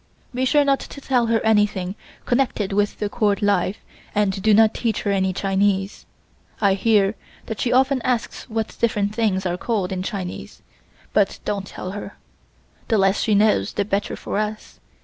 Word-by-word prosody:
Be 255 +1 0
sure 290 +2 +4
not 275 -1 +3
to - - -9
tell 250 -4 +1
her 225 0 +2
anything 205 -4 +2 0.3
connected 240 -6 0
with 205 +1 +1
the 210 - -1
Court 205 -1 0
life 205 -1 +1 0.4
and 200 -2 +1
do 215 +2 +3
not 220 +1 +5
teach 230 -2 -2
her 205 - 0
any 190 -1 +1
Chinese. 195 +1 0 0.5
I 200 -2 +3
hear 200 0 +3 0.3
that 220 - -5
she 245 - 0
often 265 +1 +3
asks 250 +1 -2
what 225 -1 -3
different 210 -3 +1
things 210 -4 0
are 175 -1 -1
called 200 -3 -1
in 185 -1 -2
Chinese, 185 -2 -6 0.5
but 200 -2 +2
don't 200 -2 -2
tell 185 - -6
her. 205 0 -8 0.7
The 225 - +2
less 195 0 +2
she 215 - +2
knows 205 - +3
the 205 - -1
better 200 0 -1
for - - -3
us. 215 0 -5
205 Hz, 175 wpm, -22 LUFS, 195-225 Hz, 0.7 s, not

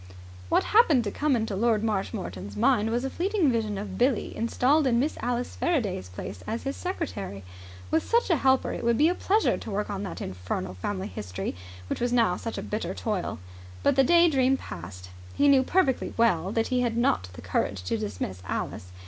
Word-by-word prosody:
What - - +3
happened 335 - +4
to 205 - -3
come 290 +2 +1
into 220 -3 -1
Lord 220 +1 +2
Marshmoreton's 100 - -3
mind 225 -2 +3
was 240 +3 -1
a - - -1
fleeting 370 -5 +1
vision 220 -3 -1
of 195 -1 -6
Billie 250 -1 +1
installed 265 +6 +2
in 235 -2 +3
Miss 295 +5 0
Alice 245 0 -2
Faraday's 215 - -1
place 90 +1 -7
as 230 +1 -3
his 275 0 -3
secretary. 240 - -4 0.5
With 160 - +3
such 470 -4 +1
a 335 - +4
helper 265 -1 +2
it - - -5
would 235 -1 +2
be 310 +3 +5
a - - +2
pleasure 415 +4 +1
to - - -8
work 205 0 -2
on 195 -1 -3
that 200 - -5
infernal 90 0 -4
Family 190 - -3
History 95 - -5 0.3
which - - -3
was 245 0 +1
now 230 -7 +3
such 230 +4 -5
a - - -4
bitter 215 +1 -3
toil. 210 -5 -2 0.5
But 280 - +3
the 270 - +5
day 345 +5 +6
dream 270 -3 +3
passed. 90 - -9 0.2
He 285 - +4
knew 275 -2 +6
perfectly 270 -1 +1
well 195 -6 +2
that 225 +1 0
he 250 -1 +1
had 235 -2 0
not 95 - +1
the - - -10
courage 95 -2 -1
to 90 - -1
dismiss 100 -3 -4
Alice. 90 - -4
230 Hz, 200 wpm, -27 LUFS, 180-270 Hz, 0.5 s, day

